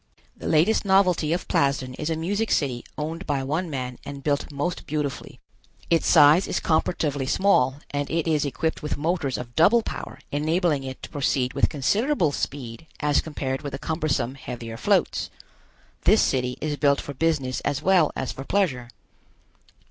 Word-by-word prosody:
The - - -7
latest 165 +8 +3
novelty 190 -6 +3
of 175 +1 -1
Plasden 135 -2 +1
is 150 +4 -4
a 165 - 0
music 200 +7 -1
city 125 -5 0
owned 160 +5 -4
by 140 -2 0
one 160 +6 -2
man 125 -3 -4
and 140 -1 -8
built 145 +1 -1
most 145 +5 -3
beautifully. 145 -3 -4 0.5
Its 165 - +3
size 150 +6 +6
is - - -1
comparatively 150 -4 0
small 135 -8 +3 0.2
and 145 0 -2
it 165 0 -1
is 155 -3 +2
equipped 155 +3 -2
with 150 - -3
motors 150 -3 -1
of 120 -1 -8
double 220 +8 +5
power - - -6
enabling 155 0 +1
it 130 0 -7
to - - -7
proceed 130 -3 0
with - - +2
considerable 200 - +1
speed 135 -1 -5
as 145 -1 +2
compared 135 -4 -4
with 145 -2 -6
the - - -2
cumbersome, 140 -5 -1
heavier 120 -4 -7
floats. - - +1 0.8
This - - +5
city 125 -1 0
is 150 -1 -2
built 140 -1 +3
for 145 - -6
business 140 -3 0
as 145 -1 -2
well 180 -5 +4
as 130 - -3
for 135 - -7
pleasure. 135 -10 0
145 Hz, 170 wpm, -24 LUFS, 135-165 Hz, 0.8 s, size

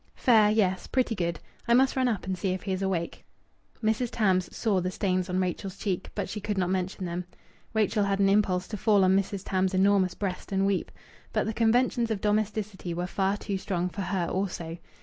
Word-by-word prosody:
"Fair. 220 -4 +5
Yes, 195 -4 +1
pretty 255 -3 +1
good. 170 -5 -2 0.3
I 235 - +5
must 265 +1 +4
run 260 -1 +2
up 220 -6 -1
and 190 0 -1
see 185 +1 -1
if 185 - -5
he 195 - -3
is 190 0 -1
awake." 185 -3 -2 0.6
Mrs. 225 +3 +1
Tams 185 -6 +1
saw 205 -5 +1
the 180 - -1
stains 185 -1 -1
on 180 +1 0
Rachel's 185 +1 -3
cheeks, 190 -3 -2
but 200 - -2
she 210 +2 -5
could 210 0 -2
not 180 -1 +1
mention 185 0 -2
them. 175 +1 -4 0.5
Rachel 210 -1 +2
had 200 0 +1
an 195 - +4
impulse 195 -2 +2
to 210 - -4
fall 205 -1 +4
on 185 0 +4
Mrs. 195 0 -1
Tams' 190 0 0
enormous 190 -1 +3
breast 195 -2 -4
and 195 0 +2
weep. 195 -1 0 0.4
But - - +1
the 220 - -2
conventions 235 +1 +2
of 220 -3 -1
domesticity 210 -3 -1
were 175 +1 -2
far 195 +2 0
too 200 -2 -3
strong 180 -2 -1
for 200 - -6
her 190 -2 -1
also. 175 -3 -3
195 Hz, 210 wpm, -28 LUFS, 185-210 Hz, 0.6 s, Fair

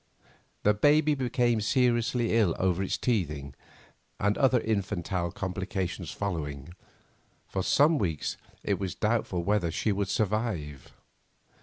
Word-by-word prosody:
The 105 - +5
baby 150 +7 +4
became 120 -4 +1
seriously 120 0 +2
ill 105 -8 +3
over 95 0 +1
its 95 - -1
teething, 75 - -1 0.7
and, 105 +1 +2
other 130 -2 +3
infantile 95 -5 -2
complications 95 -2 -3
following, 80 -6 -4 0.7
for 95 - -2
some 150 - +4
weeks 80 -7 -1 0.3
it - - 0
was 95 -2 -3
doubtful 105 -5 0
whether 100 -3 +1
she 105 +6 0
would 100 -1 -1
survive. 100 - -2
100 Hz, 120 wpm, -28 LUFS, 90-115 Hz, 0.7 s, The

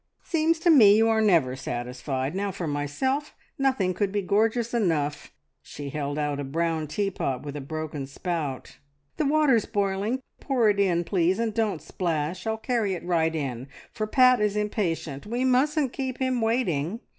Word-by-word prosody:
"Seems 330 0 +1
to 345 0 +5
me 215 -9 +7
you 225 +1 +4
are 220 0 +3
never 165 -12 +3
satisfied! 130 +2 -4
Now 200 +2 -1
for 185 -2 -5
myself 160 - -2 0.2
nothing 260 -9 +1
could 200 +1 -1
be 205 0 -1
gorgeous 225 +4 +1
enough!" 160 -10 0 0.3
She 145 -1 -8
held 145 -1 -3
out 145 -1 -1
a - - -2
brown 160 +2 -1
teapot 155 -7 -2
with 145 -1 -6
a 145 - -4
broken 150 -1 -5
spout. 150 -2 -4 0.4
"The 305 - +1
water's 285 -7 +3
boiling. 205 +4 -1 0.2
Pour 245 -6 +2
it 200 - -3
in 175 -3 +2
please, 180 0 +1
and 230 -1 -1
don't 215 -7 -1
splash! 170 +2 -2
I'll 220 0 0
carry 220 -4 -1
it 175 - -8
right 165 -2 +1
in, 130 -4 -4 0.2
for 215 -1 -3
Pat 255 +1 +5
is 210 -1 +1
impatient. 175 -8 -2
We 240 +4 -1
mustn't 270 +2 +2
keep 260 -2 -3
him 260 -2 0
waiting." 225 - 0
195 Hz, 170 wpm, -26 LUFS, 150-230 Hz, 0.4 s, me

